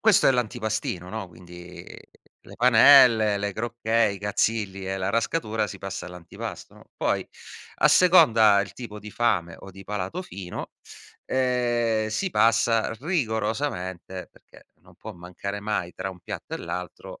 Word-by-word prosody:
questo 220 Hz, -4 st, +4 dB
è -, -, +6 dB
l'antipastino, 110 Hz, -6 st, -2 dB
no, 110 Hz, -4 st, -5 dB
quindi, 90 Hz, 0 st, -12 dB
ehm, -, -, -11 dB, 0.5 s
le -, -, -13 dB
panelle, 120 Hz, -3 st, +6 dB
le 100 Hz, 0 st, -2 dB
crocchè, 115 Hz, +1 st, 0 dB
i 100 Hz, -1 st, -3 dB
cazzilli 100 Hz, -2 st, -1 dB
e 95 Hz, -, -2 dB
la 95 Hz, +1 st, -2 dB
rascatura 110 Hz, -1 st, -1 dB
si 100 Hz, -, -8 dB
passa 95 Hz, -2 st, -6 dB
all'antipasto, 90 Hz, -1 st, -9 dB
no, -, -, -17 dB
poi -, -, -1 dB, 0.5 s
a -, -, +4 dB
seconda 115 Hz, -, +6 dB
il 100 Hz, -, -9 dB
tipo 105 Hz, -4 st, -9 dB
di 105 Hz, +1 st, -10 dB
fame 90 Hz, -8 st, 0 dB
o 95 Hz, -, -11 dB
di 95 Hz, +1 st, -13 dB
palato 105 Hz, -, -4 dB
fino, 95 Hz, -, -8 dB, 0.5 s
ehm, 120 Hz, -4 st, 0 dB
si 185 Hz, -, -2 dB
passa 115 Hz, -1 st, +2 dB
rigorosamente, 110 Hz, -, -3 dB
perché -, -, -20 dB
non -, -, -20 dB
può -, -, -9 dB
mancare 90 Hz, +3 st, -7 dB
mai 105 Hz, -4 st, -3 dB
tra 95 Hz, -, -4 dB
un 90 Hz, -, -12 dB
piatto -, -, -7 dB
e -, -, -5 dB
l'altro, 90 Hz, -1 st, -7 dB
105 Hz, 155 wpm, -25 LUFS, 95-120 Hz, 0.5 s, è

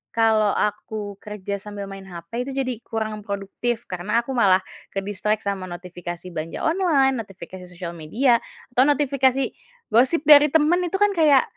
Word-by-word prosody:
kalau 220 Hz, -2 st, +4 dB
aku 210 Hz, -1 st, -3 dB
kerja 200 Hz, -1 st, -5 dB
sambil 200 Hz, -1 st, -7 dB
main 195 Hz, 0 st, -9 dB
hape 190 Hz, +9 st, -6 dB
itu 270 Hz, -, -5 dB
jadi 255 Hz, -4 st, -2 dB
kurang 220 Hz, -1 st, -3 dB
produktif, 205 Hz, +4 st, -3 dB
karena 205 Hz, +6 st, -1 dB
aku 265 Hz, -, -6 dB
malah 195 Hz, -7 st, +4 dB, 0.3 s
kedistract 205 Hz, +2 st, -1 dB
sama 195 Hz, -2 st, -3 dB
notifikasi 175 Hz, 0 st, -7 dB
belanja 160 Hz, 0 st, -5 dB
online, 305 Hz, -7 st, +2 dB
notifikasi 190 Hz, -3 st, -9 dB
sosial 175 Hz, -1 st, -7 dB
media, 230 Hz, -, +2 dB, 0.3 s
atau 250 Hz, +1 st, +4 dB
notifikasi 275 Hz, -2 st, +2 dB, 0.5 s
gosip 260 Hz, +8 st, +4 dB
dari 295 Hz, 0 st, +8 dB
temen 320 Hz, +4 st, +3 dB
itu 385 Hz, -, -3 dB
kan 410 Hz, +1 st, +3 dB
kayak, 305 Hz, -7 st, +5 dB
215 Hz, 150 wpm, -23 LUFS, 195-265 Hz, 0.5 s, dari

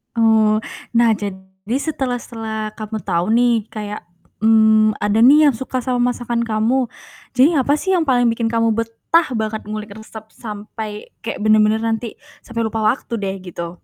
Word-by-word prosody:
Oh, 220 Hz, -1 st, +3 dB, 0.3 s
nah 235 Hz, 0 st, +4 dB
jadi 190 Hz, +2 st, -6 dB
setelah 265 Hz, -6 st, -2 dB
setelah 220 Hz, -2 st, -5 dB
kamu 215 Hz, 0 st, -5 dB
tau 170 Hz, -2 st, 0 dB
nih 235 Hz, -3 st, +3 dB
kayak, 210 Hz, -3 st, -6 dB, 0.4 s
mmm, 220 Hz, -1 st, +5 dB
ada 205 Hz, +1 st, +1 dB
nih 295 Hz, +3 st, +7 dB
yang -, -, 0 dB
suka 255 Hz, 0 st, -3 dB
sama 245 Hz, -1 st, +1 dB
masakan 235 Hz, -1 st, -2 dB
kamu. 230 Hz, +4 st, +1 dB, 0.5 s
Jadi 285 Hz, +5 st, +4 dB
apa 275 Hz, +2 st, +2 dB
sih 375 Hz, +5 st, +1 dB
yang 330 Hz, -, +1 dB
paling 245 Hz, -3 st, +3 dB
bikin 230 Hz, 0 st, -1 dB
kamu 230 Hz, 0 st, +1 dB
betah 230 Hz, +9 st, +1 dB
banget 220 Hz, -1 st, -3 dB
ngulik 215 Hz, 0 st, -6 dB
resep 220 Hz, 0 st, -11 dB
sampai 210 Hz, -1 st, -8 dB, 0.2 s
kayak 230 Hz, -, -4 dB
bener-bener 215 Hz, +1 st, +3 dB
nanti 225 Hz, 0 st, -2 dB, 0.3 s
sampai 230 Hz, -1 st, -4 dB
lupa 220 Hz, -1 st, -1 dB
waktu 235 Hz, +1 st, 0 dB
deh 195 Hz, -1 st, -3 dB
gitu? 170 Hz, -1 st, -8 dB
225 Hz, 160 wpm, -19 LUFS, 215-245 Hz, 0.5 s, nih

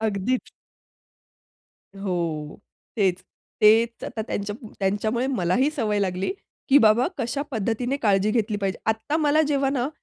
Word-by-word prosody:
अगदीच. 220 Hz, +3 st, -1 dB, 1.5 s
हो 185 Hz, -3 st, -1 dB, 0.8 s
तेच. 190 Hz, -4 st, +1 dB, 0.4 s
तेच 225 Hz, +2 st, +4 dB
आता 220 Hz, -, -4 dB
त्यांच्या 205 Hz, -1 st, -4 dB, 0.3 s
त्यांच्यामुळे 215 Hz, +5 st, 0 dB
मलाही 250 Hz, -, +1 dB
सवय 220 Hz, -9 st, -1 dB
लागली, 190 Hz, -, -1 dB, 0.4 s
की 280 Hz, 0 st, +7 dB
बाबा 225 Hz, 0 st, +4 dB
कशा 265 Hz, +3 st, -2 dB
पद्धतीने 235 Hz, +3 st, -1 dB
काळजी 205 Hz, -1 st, +3 dB
घेतली 215 Hz, -1 st, 0 dB
पाहिजे. 195 Hz, -1 st, -2 dB
आता 220 Hz, +7 st, 0 dB
मला 305 Hz, 0 st, +3 dB
जेव्हा 275 Hz, -2 st, +1 dB
ना 265 Hz, -1 st, -1 dB
220 Hz, 125 wpm, -24 LUFS, 200-260 Hz, 1.5 s, की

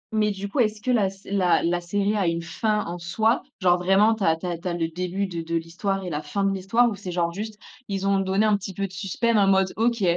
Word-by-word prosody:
Mais 210 Hz, -1 st, +2 dB
du 200 Hz, 0 st, -5 dB
coup, 260 Hz, -, -3 dB
est-ce 215 Hz, -3 st, +1 dB
que 255 Hz, -, 0 dB
la 210 Hz, -6 st, +3 dB
sé 195 Hz, +1 st, -13 dB
la 185 Hz, -3 st, +3 dB
la 175 Hz, +1 st, +1 dB
série 200 Hz, +4 st, -1 dB
a 195 Hz, -4 st, +1 dB
une 170 Hz, 0 st, 0 dB
fin 210 Hz, +5 st, -1 dB
en 170 Hz, +1 st, -5 dB
soi? 220 Hz, +8 st, +1 dB, 0.2 s
Genre 180 Hz, -1 st, +4 dB
vraiment 195 Hz, +5 st, +4 dB
tu 220 Hz, -2 st, -4 dB
as 160 Hz, -, +4 dB
tu 165 Hz, -, -9 dB
as 175 Hz, -1 st, -2 dB
tu 170 Hz, -, -7 dB
as 175 Hz, -, -1 dB
le 165 Hz, -1 st, -1 dB
début 180 Hz, +3 st, -2 dB
de 170 Hz, -3 st, -4 dB
de 165 Hz, +1 st, -3 dB
l'histoire 180 Hz, +4 st, -2 dB
et 180 Hz, -, -4 dB
la 150 Hz, -2 st, -3 dB
fin 155 Hz, +7 st, -2 dB
de 195 Hz, 0 st, +2 dB
l'histoire? 200 Hz, +6 st, +2 dB
Ou 215 Hz, -, -4 dB
c'est 185 Hz, -2 st, -7 dB
genre 170 Hz, -1 st, 0 dB
juste, 210 Hz, +4 st, -6 dB, 0.3 s
ils 195 Hz, -1 st, -3 dB
ont 195 Hz, 0 st, +3 dB
donné 195 Hz, +2 st, +1 dB
un 210 Hz, -1 st, +3 dB
petit 195 Hz, -1 st, -7 dB
peu 195 Hz, +2 st, -2 dB
de -, -, -18 dB
suspense 200 Hz, +5 st, 0 dB
en 200 Hz, -1 st, +4 dB
mode: 190 Hz, -1 st, +3 dB
«OK 230 Hz, -1 st, +1 dB
195 Hz, 285 wpm, -24 LUFS, 175-210 Hz, 0.3 s, Genre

